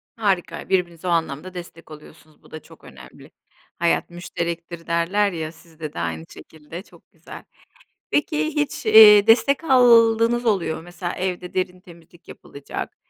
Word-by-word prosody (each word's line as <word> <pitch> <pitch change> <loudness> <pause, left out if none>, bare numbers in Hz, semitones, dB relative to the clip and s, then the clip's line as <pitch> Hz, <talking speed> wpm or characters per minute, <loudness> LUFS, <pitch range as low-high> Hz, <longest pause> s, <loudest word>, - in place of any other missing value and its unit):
Harika. 190 -6 -2
Birbirinize 180 -2 -1
o - - 0
anlamda 165 +1 -2
destek 170 -2 -11
oluyorsunuz. 155 0 -16
Bu - - -20
da 155 - -8
çok - - -19
önemli. - - -15 0.5
"Hayat 170 0 0
müşterektir." 170 -1 -6
derler 185 +5 0
ya, 160 -3 -5
sizde 160 -2 -11
de - - -7
aynı 80 -1 -4
şekilde. 160 - -12
Çok - - -22
güzel. - - -13 0.7
Peki 300 +1 0
hiç, 295 -6 -3
eee, 215 -1 +8
destek 235 +7 +3
aldığınız 235 -3 +4
oluyor 175 -7 0
mu? - - -10
Mesela 175 0 -6
evde 180 -1 -5
derin 185 -1 -3
temizlik 170 -1 -19
yapılacak, 140 0 -9
175 Hz, 145 wpm, -22 LUFS, 165-215 Hz, 0.7 s, eee